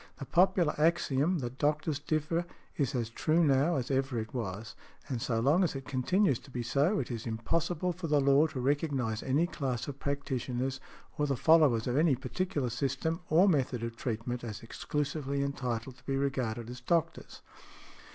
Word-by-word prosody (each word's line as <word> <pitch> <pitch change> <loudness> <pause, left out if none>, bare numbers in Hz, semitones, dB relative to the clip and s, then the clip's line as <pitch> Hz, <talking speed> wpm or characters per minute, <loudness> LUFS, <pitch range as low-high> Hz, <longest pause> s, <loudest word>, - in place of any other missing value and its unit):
The 140 - -6
popular 180 0 +3
axiom 165 0 +2
that 120 +1 -6
doctors 150 0 0
differ 155 +3 -1 0.3
is 135 -3 -1
as 115 -2 -2
true 160 +7 +2
now 145 +3 +3
as 130 0 -2
ever 135 -2 0
it 110 0 -4
was, 110 -1 -4 0.3
and 125 -4 -3
so 115 -1 0
long 145 +10 +4
as 165 - 0
it 135 -1 -6
continues 140 - +1
to 145 - -16
be 125 -2 -4
so, 145 - +2
it - - -3
is 115 0 -5
impossible 165 +10 -1
for 175 0 -5
the 150 -1 +3
law 140 +3 +5
to 140 -4 -6
recognize 130 -4 0
any 140 +6 +2
class 130 -8 -3
of 140 -1 -6
practitioners, 135 -2 -2 0.4
or 145 - +2
the 135 -2 0
followers 150 -7 +5
of 125 +1 0
any 155 -3 +4
particular 145 -1 -2
system, 140 +8 -1
or 170 +6 +5
method 130 - +1
of 115 0 -4
treatment, 120 +1 -3
as 110 -2 -6
exclusively 140 +3 -2
entitled 125 -2 -3
to 125 - -22
be 135 -1 0
regarded 125 -5 -1
as 125 0 -9
"doctors". 165 +4 -1
140 Hz, 180 wpm, -31 LUFS, 125-155 Hz, 0.4 s, law